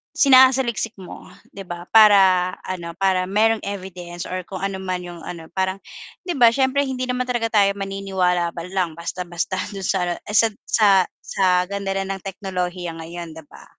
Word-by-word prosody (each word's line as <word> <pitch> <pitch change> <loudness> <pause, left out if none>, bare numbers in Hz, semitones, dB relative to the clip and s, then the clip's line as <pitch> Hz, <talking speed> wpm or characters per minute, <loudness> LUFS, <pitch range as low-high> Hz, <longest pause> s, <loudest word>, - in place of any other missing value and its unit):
sinasaliksik 260 -4 +4
mo 185 -2 -11 0.3
'di 195 -1 -9
ba, 175 0 -8
para 190 -4 +6
ano, 170 -2 -6
para 190 -1 +2
merong 215 +3 +1
evidence 185 -3 -7
or 185 -1 -4
kung 190 0 -7
ano 195 0 -2
man 185 -1 -3
yung 175 -2 -10
ano. 165 -2 -8
Parang 190 +1 -2 0.4
'di 355 -5 -4
ba 235 -3 +6
siyempre 270 +2 +1
hindi 255 -1 -4
naman 250 0 -1
talaga 240 -2 -1
tayo 200 -3 +3
maniniwala 190 -3 -1 0.2
lang 185 -3 -1
basta-basta 175 +2 -4 0.2
dun 195 - -6
sa 190 - +1
ano, 175 - -1 0.2
sa 215 +2 +5 0.2
sa 215 -2 +4 0.3
sa 195 - -2 0.2
ganda 195 0 -3
rin 195 0 -2
ng 195 - -8
teknolohiya 180 -3 -4
ngayon 170 0 -8
'di 160 - -10
ba. - - -15
190 Hz, 170 wpm, -21 LUFS, 180-215 Hz, 0.4 s, para